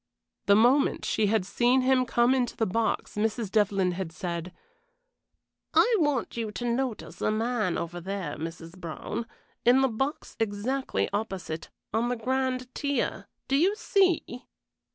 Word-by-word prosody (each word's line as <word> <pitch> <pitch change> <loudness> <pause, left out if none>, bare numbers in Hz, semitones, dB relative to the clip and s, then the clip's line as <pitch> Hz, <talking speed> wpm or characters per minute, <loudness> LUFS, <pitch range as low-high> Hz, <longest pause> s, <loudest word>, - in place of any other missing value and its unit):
The 200 - +7
moment 250 +6 +4
she 215 - +1
had 210 -2 +1
seen 245 +6 +3
him 255 -1 +3
come 240 +2 +3
into 250 -3 0
the 225 - +2
box 220 +4 -1
Mrs. 215 0 -1
Devlyn 200 -4 +2
had 180 -2 -4
said, 170 +1 -4 1.2
"I 480 -1 +5
want 295 -6 0
you 230 -2 -2
to 245 - -4
notice 240 -1 -2
a - - +2
man 215 -4 0
over 175 +1 -4
there, 190 -4 -4
Mrs. 165 +2 -7
Brown, 185 +6 -5 0.4
in 250 +3 +5
the 265 - +4
box 270 +6 -3
exactly 225 +5 -1
opposite; 190 -6 -3 0.2
on 230 +2 +1
the 245 - 0
grand 255 +1 -1
tier 285 -1 -1 0.2
do 275 - +1
you 365 +8 +3
see?" 365 - +1
230 Hz, 150 wpm, -28 LUFS, 195-255 Hz, 1.2 s, The